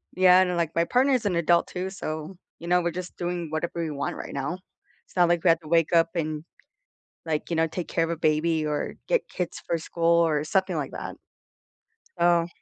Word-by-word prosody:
Yeah, 185 0 +6
and 180 -1 +1
like, 165 -2 -1
my 170 - +3
partner 260 +7 +3
is 250 -4 +1
an 195 -4 +1
adult 170 +1 +3
too, 185 +1 -4
so, 160 -2 -6 0.2
you 170 - -8
know, 180 +1 +3
we're 175 0 -1
just 180 +1 -7
doing 175 -2 -3
whatever 165 +2 -3
we 160 - -2
want 140 -1 -3
right - - -7
now. 140 +6 -3 0.5
It's - - -24
not 175 -2 +5
like 175 -1 +1
we 180 - +5
have 165 0 +4
to 155 - -13
wake 165 +1 +2
up 165 0 +5
and, 155 -2 -2 0.8
like, 155 -2 -2
you 170 - -1
know, 160 0 +2
take 170 +2 -5
care 165 - 0
of 165 - -1
a 170 - -2
baby 155 +1 +1
or 150 -1 -2
get - - +1
kids 180 -2 -4
for 170 - 0
school 165 +1 -7 0.2
or 155 -3 +2
something 190 +3 0
like 145 -4 -3
that. - - -6 1.0
So 170 -1 +4
170 Hz, 225 wpm, -26 LUFS, 155-180 Hz, 1.0 s, Yeah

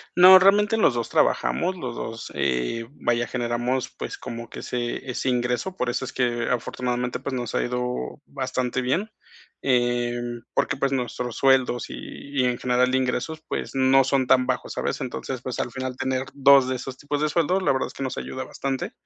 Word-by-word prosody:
No, 185 +1 +10
realmente 205 +3 +4
los 215 - +4
2 120 -2 -2
trabajamos, 185 +2 +1
los 125 -5 -5
2, 115 0 -6
eh, 70 - -1
vaya, 120 -4 0
generamos, 120 +1 -1
pues, - - -6
como 115 0 -7
que - - -9
ese 120 +1 -3
ese 125 +1 -1
ingreso, 125 +9 -1
por 125 -8 -2
eso 125 +2 -1
es - - -6
que 120 -2 0
afortunadamente, 125 0 -2
pues, 135 +1 -5
nos 120 -2 -4
ha - - +2
ido 125 - -3
bastante 130 -2 -2
bien. 180 - 0 0.5
Em, 120 -2 0
porque, - - +1
pues, 135 0 0
nuestros 125 -2 -2
sueldos, 130 -3 +3
y - - -8 0.5
y - - +2
en 125 -1 +1
general 125 0 +2
de 130 - +2
ingresos, 130 +5 -2
pues, - - -4
no 135 0 +5
son 135 -1 +1
tan 130 -1 +4
bajos, 130 - -2
¿sabes? - - -2
Entonces, 130 -1 -4
pues, 125 -2 -5
al 120 - -1
final 130 0 -4
tener 130 0 -1
2 140 -1 +6
de 130 - 0
esos 130 +1 -7
tipos 145 0 -2
de 155 - +1
sueldos, 180 +4 +1
la - - +3
verdad 130 - 0
es - - -11
que - - -6
nos 130 - -3
ayuda 130 - -5
bastante. 135 -1 -3
125 Hz, 195 wpm, -24 LUFS, 120-135 Hz, 0.5 s, No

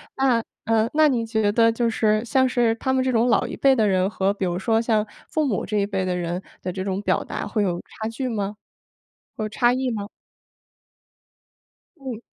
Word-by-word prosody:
那， 255 -4 +2 0.2
呃， 225 +1 +2
那 310 -1 +5
你 235 -3 0
觉 220 -2 +1
得 230 +1 +4
就 230 0 0
是 215 -1 +1
像 260 +2 +2
是 240 -2 +2
他 260 +3 -1
们 260 0 +2
这 260 - +1
种 235 +1 +2
老 235 - +3
一 - - -6
辈 270 -1 +4
的 220 -4 +2
人 190 0 +2
和 195 0 0
比 195 -2 -3
如 175 0 -1
说 225 +3 +1
像 220 -2 +1 0.2
父 310 -2 0
母 220 -8 -1
这 210 - -2
一 200 - +2
辈 190 -2 -2
的 180 -1 -1
人 175 +1 -3 0.2
的 180 - -3
这 185 - -5
种 195 0 -2
表 - - 0
达 - - -4
会 215 - -1
有 175 -2 -1
差 220 - -7
距 255 +3 -3
吗？ 205 -2 -3 0.8
或 215 -1 -3
差 240 +3 +2
异 255 0 -1
吗？ 205 -3 -3 1.9
嗯。 255 -5 -6
225 Hz, 225 characters per minute, -23 LUFS, 200-245 Hz, 1.9 s, 那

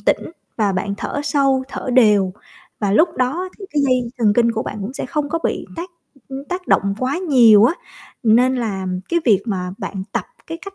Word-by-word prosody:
tĩnh - - 0 0.3
và 210 -3 +1
bạn 200 +2 -2
thở 285 - -4
sâu, 275 -2 +2
thở 270 -1 -5
đều, 210 -6 +4 0.5
và 200 -2 0
lúc 320 - +5
đó 290 +9 -1
thì 395 - -8
cái 290 - +1
dây 255 -3 +1
thần 215 -3 +3
kinh 235 -1 +3
của 225 - -2
bạn - - -6
cũng 205 +6 -5
sẽ 275 - -5
không 295 +2 -2
có 330 +2 -1
bị - - -1
tác, 345 +2 -6 0.4
ưm, 270 +1 -7
tác 360 +3 -5
động 200 0 +2
quá 255 +6 -1
nhiều 240 - +6
á. 285 +9 +3 0.5
Nên 250 +3 +4
là 200 -6 -3 0.2
cái 340 0 +1
việc 205 -5 +4
mà 180 -4 -2
bạn 190 -2 -5
tập - - -1 0.2
cái 330 0 -6
cách 395 0 -9
250 Hz, 210 wpm, -19 LUFS, 210-290 Hz, 0.5 s, nhiều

